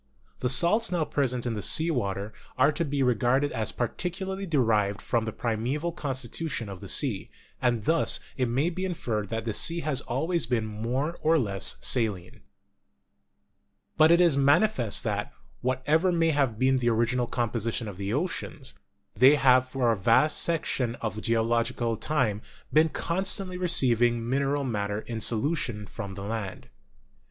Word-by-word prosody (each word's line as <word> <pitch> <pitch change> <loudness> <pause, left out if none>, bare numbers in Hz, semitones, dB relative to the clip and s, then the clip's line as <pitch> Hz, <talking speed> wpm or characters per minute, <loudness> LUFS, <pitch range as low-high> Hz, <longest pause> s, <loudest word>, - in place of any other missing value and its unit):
The 125 - 0
salts 185 - +3
now 170 -3 0
present 125 -5 -1
in 115 -4 -2
sea 160 - +2
water 100 -6 -3 0.2
are 135 +4 +4
to 170 - -2
be 140 -3 -1
regarded 125 +4 +2
as 110 -1 -1
partially 190 - -4
de 155 -4 +1
rived 105 -4 +1
from 115 -2 -1
the 110 - -3
primeval 125 +10 -2
constitution 130 -4 -4
of 95 -2 -8
the - - -9
sea, - - +1 0.3
and 120 -4 0
thus 165 +1 +2 0.2
it 130 -3 0
may 140 +8 +1
be 185 +2 -4
inferred 115 - -3
that 115 0 -3
the 110 - -2
sea 170 +9 +1
has 150 -5 -1
always 160 +8 -1
been 115 -3 0
more 120 +9 -3
or 160 +1 +3
less 100 - 0
saline. 105 -8 -1 1.5
But 155 0 +6
it 170 +1 +5
is 170 -5 +4
manifest 140 - +3
that, - - -3 0.3
whatever 145 +8 +1
may 165 -1 +2
have 135 -7 0
been 130 +2 +2
the 120 -1 +1
original 120 +2 +1
composition 115 -1 -2
of 100 -3 -7
the 100 +1 -3
oceans, 150 -1 -3 0.4
they 130 +6 +6
have 130 -2 +4
for 130 -3 +1
a - - +1
vast 115 +10 +3
section 140 -8 -1
of 110 -2 -5
geological 115 +1 0
time 110 -5 -1 0.3
been 155 +1 +5
constantly 185 +3 -1
receiving 120 -9 +2
min 135 +3 +1
eral 140 0 -1
matter 105 -2 -2
in 115 -1 -6
solution 115 -3 -1
from 100 -2 -7
the 100 - -7
land. 105 -2 -5
125 Hz, 160 wpm, -27 LUFS, 115-155 Hz, 1.5 s, But